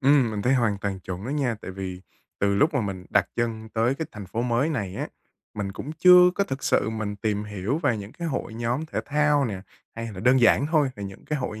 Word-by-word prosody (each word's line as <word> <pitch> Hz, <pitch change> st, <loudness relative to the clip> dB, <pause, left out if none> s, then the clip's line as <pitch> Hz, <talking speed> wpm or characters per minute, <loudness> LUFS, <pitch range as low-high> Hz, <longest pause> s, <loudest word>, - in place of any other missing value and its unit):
Ừm, 135 Hz, -4 st, +4 dB
mình 105 Hz, -1 st, -3 dB
thấy 130 Hz, +2 st, +3 dB
hoàn 110 Hz, -6 st, +1 dB
toàn 100 Hz, -2 st, -3 dB
chuẩn 95 Hz, +2 st, -6 dB
đó 130 Hz, -, -4 dB
nha. 135 Hz, -5 st, 0 dB
Tại -, -, -6 dB
vì 95 Hz, -1 st, -6 dB, 0.4 s
từ 100 Hz, 0 st, +2 dB
lúc 150 Hz, -, +3 dB
mà 135 Hz, -, +2 dB
mình 95 Hz, -3 st, -4 dB
đặt 105 Hz, -3 st, +4 dB
chân 110 Hz, -2 st, -2 dB
tới 115 Hz, +4 st, +1 dB
cái 160 Hz, +1 st, -4 dB
thành 105 Hz, -2 st, -8 dB
phố 115 Hz, +6 st, -2 dB
mới 125 Hz, +5 st, +1 dB
này 100 Hz, -, -3 dB
á, -, -, -3 dB, 0.5 s
mình 100 Hz, -2 st, -3 dB
cũng 145 Hz, +9 st, -6 dB
chưa 180 Hz, +1 st, +7 dB
có 200 Hz, -, +1 dB
thực 135 Hz, -8 st, -5 dB
sự 110 Hz, -, +2 dB
mình 110 Hz, -2 st, -3 dB
tìm 105 Hz, 0 st, -1 dB
hiểu 105 Hz, -, -2 dB
về 145 Hz, -9 st, +1 dB
những 100 Hz, +2 st, -8 dB
cái 170 Hz, -1 st, -4 dB
hội 130 Hz, -5 st, -3 dB
nhóm 120 Hz, +7 st, -2 dB
thể -, -, -3 dB
thao 150 Hz, -1 st, +3 dB
nè, 100 Hz, -5 st, -3 dB, 0.3 s
hay 115 Hz, 0 st, -5 dB
là 95 Hz, -, -7 dB
đơn 125 Hz, +2 st, +4 dB
giản 130 Hz, +4 st, +5 dB
thôi, 155 Hz, -3 st, +3 dB
là 100 Hz, -, -7 dB
những 95 Hz, -1 st, -8 dB
cái 150 Hz, -, -2 dB
hội 110 Hz, -4 st, -4 dB
115 Hz, 255 wpm, -25 LUFS, 100-140 Hz, 0.5 s, chưa